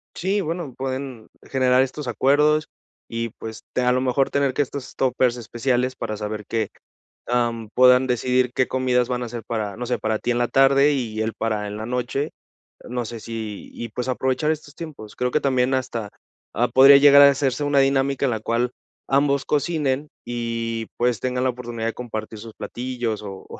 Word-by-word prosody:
Sí, 195 +3 0
bueno, 165 -6 -4
pueden 130 -3 -5 0.2
generar 130 -1 +3
estos 135 0 -4
acuerdos, 150 +4 +3 0.4
y 115 0 -3
pues, 110 0 -8
te 125 - 0
a 125 0 +3
lo 130 - +1
mejor, 130 +1 +1
tener 140 -2 +1
que - - -1
estos 140 -1 -7
tópers 125 -1 +1
especiales 125 +2 -1
para 110 -2 -4
saber 105 0 -5
que, 110 -3 -1 0.6
am, 115 -2 0
puedan 125 +1 +6
decidir 125 +1 +1
qué 130 - +1
comidas 125 -1 +1
van 125 -1 -2
a 120 - -4
ser 115 -1 -7
para, 105 -4 -3
no 125 +1 -5
sé, 125 - -1
para 110 -1 -1
ti 120 - -1
en 120 - -1
la 120 0 +1
tarde, 135 +2 +5
y 115 -5 -2
él 110 0 -1
para 105 -2 -1
en 105 - -6
la 110 +1 -5
noche. 125 +4 -2 0.6
No 125 0 -2
sé, 115 0 -7
si, 110 -2 -6
y 120 - -6
pues, 125 +4 -4
aprovechar 130 +4 0
estos 150 -2 -6
tiempos. 150 -11 -9
Creo 125 0 -1
que 150 - +1
también 130 -1 +1
hasta, 120 -5 -2 0.4
ah, 120 +3 +2
podría 135 +3 +8
llegar 140 0 +8
a 140 - +9
hacerse 135 0 0
una 145 -1 +3
dinámica 135 0 +2
en 130 - +1
la 110 - -2
cual, 120 +3 0 0.4
ambos 140 0 +2
cocinen 150 -2 0 0.2
y 115 -1 -3
pues, 120 -2 +1
tengan 125 0 -1
la 130 - +2
oportunidad 120 -2 -4
de 115 - -2
compartir 110 -3 -6
sus 110 0 -10
platillos, 120 -1 -4
o 95 -2 -8
125 Hz, 195 wpm, -23 LUFS, 115-135 Hz, 0.6 s, a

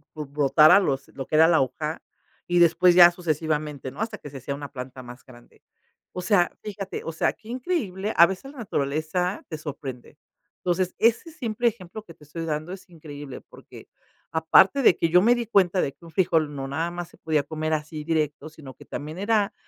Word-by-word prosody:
b 150 - -5
brotara 150 +5 +5
los 140 -8 -1
lo 135 -1 -7
que - - -2
era 160 +1 +7
la 165 - +4
hoja 150 +5 -3 0.5
y 175 0 +2
después 175 +1 +5
ya 175 -1 +9
sucesivamente, 155 -5 -3
¿no?, - - -14
hasta 220 - -3
que 145 - -10
se 140 - -9
hacía 140 +2 -5
una 145 0 -8
planta 130 -1 -8
más 120 +1 -12
grande, 120 -2 -18 0.5
o 180 - -4
sea, 180 -1 +2
fíjate, 195 -2 -6
o 165 - -3
sea, 160 - 0
que 220 +1 -17
increíble 230 - -3
a 170 - +9
veces 195 +9 -7
la 285 - -13
naturaleza 160 +1 -2
te 155 - -5
sorprende, 140 -5 -8 0.5
entonces 180 +1 0
ese 235 +9 +2
simple 240 -5 -2
ejemplo 205 -1 -5
que 165 - -13
te 155 - -21
estoy 165 +3 -7
dando 155 +2 -3
es 190 0 -9
increíble 145 -4 -10
porque - - -15 0.4
aparte 190 +11 +4
de 185 - +6
que 165 - +1
yo 180 +2 +5
me 240 +4 +4
di 240 -1 -3
cuenta 190 -4 +2
de 135 - -1
que 170 - -19
un - - -11
frijol 160 -4 +1
no 135 -1 -5
nada 160 +5 -2
más 175 0 -6
se - - -20
podía 155 -3 0
comer 155 +1 -3
así 155 0 -4
directo, 155 -2 -1
sino 150 -4 -12
que - - -16
también 155 +3 -7
era, 205 0 +1
165 Hz, 205 wpm, -25 LUFS, 150-190 Hz, 0.5 s, ya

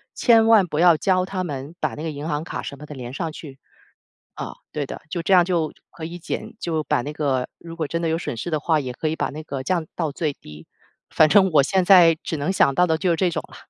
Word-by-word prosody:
千 225 -2 +5
万 215 -5 +5
不 150 -2 -3
要 170 -2 +6
教 185 +2 +1
他 185 -1 -3
们 140 -1 -6
把 - - -2
那 150 - -7
个 165 - -2
银 145 +1 -6
行 150 -1 -2
卡 175 - -5
什 140 - -7
么 150 - -10
的 150 - -9
连 125 -2 -8
上 160 +3 -3
去。 145 -3 -10 0.8
啊， - - -6 0.2
对 150 - -3
的， - - -8
就 170 0 -3
这 195 - 0
样 180 -2 +7
就 170 -4 0 0.2
可 160 - -9
以 170 +2 -7
减 170 - -5
就 160 -3 -2
把 - - +1
那 140 - -5
个 135 -4 -1
如 165 -1 -10
果 160 -3 -3
真 165 +2 -2
的 165 - 0
有 160 0 0
损 145 -7 -5
失 175 - -5
的 155 -2 -1
话， 160 +1 +2
也 130 -4 -4
可 155 +5 -3
以 160 - -2
把 - - -2
那 155 +2 -7
个 140 -4 -5
降 170 +2 -1
到 160 -4 -2
最 150 -1 -2
低， 75 - -13 0.4
反 155 - +5
正 190 +2 +5
我 150 - +6
现 190 +7 +1
在 175 -3 +7
只 160 - -3
能 150 +6 -1
想 140 -7 +3
到 180 +5 +3
的 160 -2 +1
就 185 - -1
是 170 - +2
这 180 +1 +1
种 160 -2 -3
了。 - - -14
160 Hz, 295 characters per minute, -22 LUFS, 145-175 Hz, 0.8 s, 样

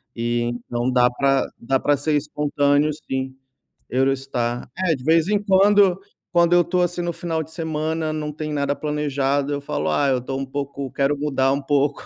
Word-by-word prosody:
E 120 0 -1
então 120 +1 -2
dá 125 -1 +4
para 135 +1 +2
dá 135 +3 +1
para 145 +1 +2
ser 150 +2 0
espontâneo, 145 0 +1
sim. 130 -3 -5 0.6
Eurostar. 130 -2 -1
É 185 -3 +1
de 130 - -8
vez 160 +4 +3
em 205 0 +1
quando, 195 -1 +4 0.3
quando 170 -1 +3
eu 175 - +6
estou, 180 +1 +1
assim, 175 0 -1
no 175 0 -1
final 165 -1 -3
de 155 - -11
semana, 160 -1 -2
não 150 -1 -3
tem 150 0 -5
nada 145 -1 -1
planejado, 145 -2 -1
eu 145 - -2
falo: 80 - -2
"Ah, 140 - +2
eu 130 - +2
estou 135 +2 -4
um 135 - -2
pouco", 140 0 -5
quero 140 +1 +1
mudar 135 -2 +1
um 140 +1 -1
pouco, 145 0 +1
145 Hz, 190 wpm, -22 LUFS, 135-160 Hz, 0.6 s, eu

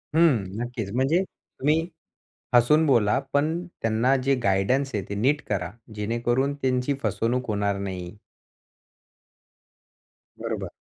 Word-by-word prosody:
हं, 160 -10 +4 0.2
नक्कीच. 120 -4 -4
म्हणजे 150 +9 +2
तुम्ही 160 -1 -2 0.7
हसून 150 +7 +5
बोला, 115 -5 +3
पण 160 +5 +1 0.2
त्यांना 115 +4 +2
जे 135 0 +3
गाईडन्स 110 +8 +2
आहे 100 - -1
ते 100 - -3
नीट 135 +8 +2
करा, 95 -3 -1 0.2
जेणेकरून 120 +6 0
त्यांची 125 +1 +1
फसवणूक 120 +2 0
होणार 100 -1 0
नाही. 95 -2 -5 2.2
बरोबर. - - -4
125 Hz, 110 wpm, -25 LUFS, 105-140 Hz, 2.2 s, हसून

